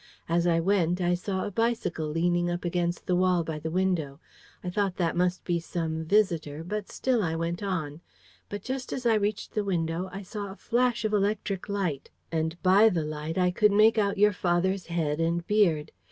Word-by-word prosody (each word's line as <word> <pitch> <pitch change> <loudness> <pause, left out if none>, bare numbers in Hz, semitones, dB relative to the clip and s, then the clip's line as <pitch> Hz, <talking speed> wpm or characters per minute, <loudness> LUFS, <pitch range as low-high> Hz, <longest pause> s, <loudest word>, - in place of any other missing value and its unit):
As 170 +1 +1
I 165 -1 +3
went, 180 -1 +1
I 175 -1 +2
saw 190 +2 -2
a - - -4
bicycle 225 -7 -1
leaning 175 +3 +1
up 175 +1 -3
against 175 0 -1
the 180 - +1
wall 180 -1 +3
by 160 -1 -4
the 160 +1 -4
window. 165 -5 -1 0.4
I 180 - -3
thought 195 -1 0
that 170 -3 0
must 180 +1 0
be 175 -1 0
some 160 -1 -3
visitor, 165 -6 +1
but 210 +3 -4
still 255 -3 0
I 165 -4 -1
went 165 +2 -2
on. 165 -6 -3 0.5
But 205 -1 -6
just 260 0 -4
as 255 - -4
I 230 - +5
reached 210 -1 -1
the 210 - 0
window, 175 -1 -1
I 195 +1 -7
saw 205 +1 -6
a - - -9
flash 240 0 0
of 215 - 0
electric 200 -1 -1
light; 185 -9 -2 0.2
and 160 +1 -1
by 195 +4 +6
the 165 -6 -1
light, 155 +2 -4
I 180 -1 +3
could 210 +3 +3
make 215 +2 +5
out 200 -1 +1
your 210 +1 +5
father's 185 +1 0
head 160 -3 -1
and 170 +1 0
beard. 170 -8 +2
180 Hz, 200 wpm, -27 LUFS, 165-205 Hz, 0.5 s, by